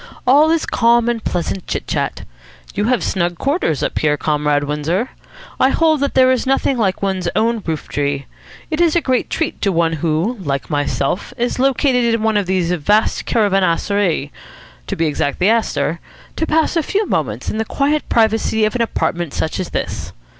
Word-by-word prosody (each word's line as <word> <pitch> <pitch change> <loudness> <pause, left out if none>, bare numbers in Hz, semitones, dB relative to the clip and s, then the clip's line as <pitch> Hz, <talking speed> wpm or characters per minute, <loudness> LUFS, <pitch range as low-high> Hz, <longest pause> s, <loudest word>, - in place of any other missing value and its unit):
All 290 +5 +5
is 330 -1 +1
calm 235 0 +3
and 235 -2 -1
pleasant 175 +1 -3
chit - - -3
chat. - - -3 0.5
You 205 - -1
have 245 0 +1
snug 175 -2 -1
quarters 275 - 0
up - - -1
here, 150 -1 +1
Comrade 150 -1 +1
Windsor. 150 - -1 0.5
I 260 - +5
hold 315 +1 +2
that 280 0 -1
there 260 0 +5
is 260 0 0
nothing 270 0 +2
like 200 -5 0
one's 190 -3 -1
own 225 +1 +1
roof 160 -2 -3
tree. 140 -1 -2 0.5
It 310 +2 0
is 335 -2 +3
a - - +5
great 255 -4 0
treat 325 - -2
to 200 - +2
one 165 -2 +1
who, 165 - -1
like 140 -2 -3
myself, 145 +3 -1
is 240 +1 -1
located 250 -3 +2
in 225 - -3
one 220 -1 +1
of 205 -3 +1
these 180 -2 0
vast 205 +6 +1
caravanserai 195 - +1 0.6
to - - -2
be 165 - 0
exact, 145 -2 -1
the 190 - +3
Astor 170 -8 0 0.4
to 320 - -1
pass 320 +2 +1
a 330 - +3
few 410 +7 -1
moments - - -2
in 215 - -3
the - - +1
quiet 290 +6 -1
privacy 220 -1 +2
of 215 - -1
an 250 - -1
apartment 175 -8 -1
such 160 - -2
as 185 - -3
this." - - -4
210 Hz, 190 wpm, -18 LUFS, 165-255 Hz, 0.6 s, All